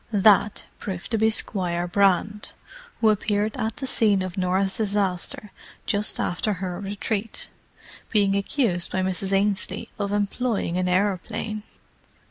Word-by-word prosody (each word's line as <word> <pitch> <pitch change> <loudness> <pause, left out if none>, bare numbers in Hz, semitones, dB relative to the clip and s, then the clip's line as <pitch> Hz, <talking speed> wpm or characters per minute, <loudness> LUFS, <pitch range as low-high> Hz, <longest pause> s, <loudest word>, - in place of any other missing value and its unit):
"That" 205 0 +4
proved 190 0 -6
to 225 - +1
be 220 +1 +4
Squire 175 -5 +1
Brand, 200 +2 +1 0.5
who 220 - +5
had 210 -2 +2
appeared 210 0 0
at 225 -3 -3
the 275 - -4
scene 210 -7 +2
of 185 -2 -5
Norah's 190 +1 0
disaster 200 -1 0 0.3
just 205 0 +2
after 205 +4 0
her 180 -1 -4
retreat—being 205 0 -3
accused 200 -3 0
by 185 - 0
Mrs. 190 +1 -1
Ainslie 200 +3 0
of 200 -1 -1
employing 205 -2 -1
an 180 0 0
aeroplane. 205 +3 -1
200 Hz, 130 wpm, -24 LUFS, 185-215 Hz, 0.5 s, who